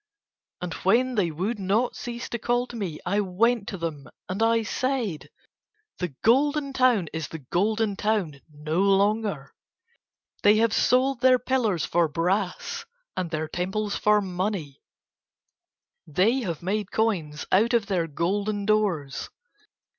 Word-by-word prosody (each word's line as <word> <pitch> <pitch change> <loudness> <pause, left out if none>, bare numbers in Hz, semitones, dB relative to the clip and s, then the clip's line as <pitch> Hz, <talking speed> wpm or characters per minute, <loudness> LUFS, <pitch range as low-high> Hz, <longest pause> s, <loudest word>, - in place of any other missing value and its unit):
And 180 -2 -4
when 250 +7 +3
they 200 -7 +1
would 190 +8 -3
not 205 +6 +1
cease 240 -1 -6
to 235 - -3
call 245 +2 +1
to 240 - -10
me 185 -9 -4
I 205 - +1
went 205 +3 +1
to 195 - -4
them 160 -5 -5 0.2
and 190 +4 -3
I 225 0 +3
said: 235 - -2 0.7
"The 175 -7 -3
Golden 280 +4 +3
Town 250 -9 +3
is 160 -2 -3
the 160 - -7
Golden 215 +3 +1
Town 195 -9 -1
no 155 +4 -2
longer. 200 -6 +1 0.9
They 205 +1 +6
have 225 0 +2
sold 255 0 +2
their 255 -1 +6
pillars 235 - 0
for 170 -1 +2
brass 185 - -1 0.3
and 180 -2 -2
their 155 -1 -2
temples 190 +5 -2
for 210 0 +3
money, 185 -6 -3 1.3
they 195 - +2
have 175 - -4
made 205 +2 -2
coins 170 -9 -1
out 225 +6 +4
of 230 -3 +2
their 180 -5 0
golden 200 +6 -1
doors. 195 -10 0
205 Hz, 140 wpm, -26 LUFS, 175-230 Hz, 1.3 s, They